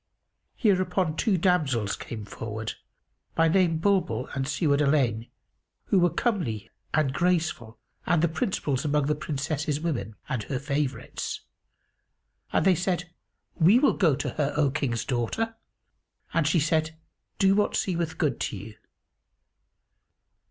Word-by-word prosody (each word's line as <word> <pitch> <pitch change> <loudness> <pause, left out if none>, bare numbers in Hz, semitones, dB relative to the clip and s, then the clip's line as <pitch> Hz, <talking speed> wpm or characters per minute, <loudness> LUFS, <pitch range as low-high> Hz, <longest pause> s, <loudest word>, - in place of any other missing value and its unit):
Hereupon 185 - +1
two 200 +2 +2
damsels 150 - +1
came 110 -3 -7
forward, 110 +1 -5 0.6
by 165 0 +4
name 170 -1 +3
Bulbul 190 +1 +1
and 135 -1 -2
Siwád 145 -1 +2
al 145 0 +3
'Ayn, 120 -6 +1 0.6
who 195 - +3
were 175 0 +4
comely 160 - -1 0.2
and 150 -4 +1
graceful 160 -9 0 0.3
and 170 -2 +3
the - - +5
principals 160 - -1
among 150 -1 +1
the 150 - +2
Princess's 150 0 -2
women, 120 -11 -3
and 125 - -2
her 135 - -2
favourites. 140 0 -3 1.1
And - - +2
they 190 - +6
said, 180 -1 -1 0.4
"We 180 +8 +5
will 275 +2 +4
go 160 -8 +3
to 145 - -3
her, 145 -2 -1
O 145 -3 +3
King's 130 -5 -1
daughter!"; 145 - -1 0.8
and 165 -3 +2
she 165 +2 +3
said, 155 +1 0 0.4
"Do 195 0 +4
what 205 +1 +2
seemeth 170 -3 -1
good 150 -5 0
to 105 - -2
you." 105 +3 -10
155 Hz, 140 wpm, -27 LUFS, 135-180 Hz, 1.1 s, they